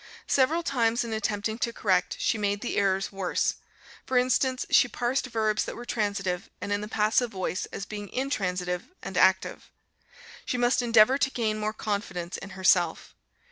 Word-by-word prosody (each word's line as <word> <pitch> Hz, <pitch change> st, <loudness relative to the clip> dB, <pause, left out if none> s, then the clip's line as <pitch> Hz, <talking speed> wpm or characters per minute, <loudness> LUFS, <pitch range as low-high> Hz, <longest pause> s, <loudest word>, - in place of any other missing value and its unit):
Several 310 Hz, +6 st, +2 dB
times, 235 Hz, -5 st, +1 dB
in 230 Hz, -1 st, -4 dB
attempting 220 Hz, +1 st, -2 dB
to 235 Hz, -, 0 dB
correct, 190 Hz, -5 st, +1 dB
she -, -, +1 dB
made 205 Hz, -1 st, -1 dB
the 245 Hz, -, -3 dB
errors 195 Hz, -1 st, +1 dB
worse; 195 Hz, -2 st, -1 dB, 0.5 s
for 260 Hz, -, 0 dB
instance 255 Hz, +1 st, +2 dB
she 245 Hz, -, +6 dB
parsed 245 Hz, +3 st, -1 dB
verbs 220 Hz, -3 st, 0 dB
that -, -, -6 dB
were 240 Hz, -, -8 dB
transitive 200 Hz, -6 st, -2 dB
and 205 Hz, -, -5 dB
in 205 Hz, -, -1 dB
the 210 Hz, -, -5 dB
passive 220 Hz, +3 st, +1 dB
voice 185 Hz, -2 st, -3 dB
as 195 Hz, -, -6 dB
being 205 Hz, -1 st, -7 dB
intransitive 180 Hz, -9 st, -2 dB, 0.2 s
and -, -, -6 dB
active. -, -, +2 dB, 0.7 s
She 250 Hz, -, -2 dB
must 245 Hz, +1 st, +2 dB
endeavor 235 Hz, +2 st, +5 dB
to 265 Hz, -, +2 dB
gain 220 Hz, -4 st, -1 dB
more 215 Hz, 0 st, -1 dB
confidence 200 Hz, -5 st, -4 dB
in 195 Hz, -, -9 dB
herself. 180 Hz, -3 st, +2 dB
215 Hz, 170 wpm, -27 LUFS, 195-245 Hz, 0.7 s, she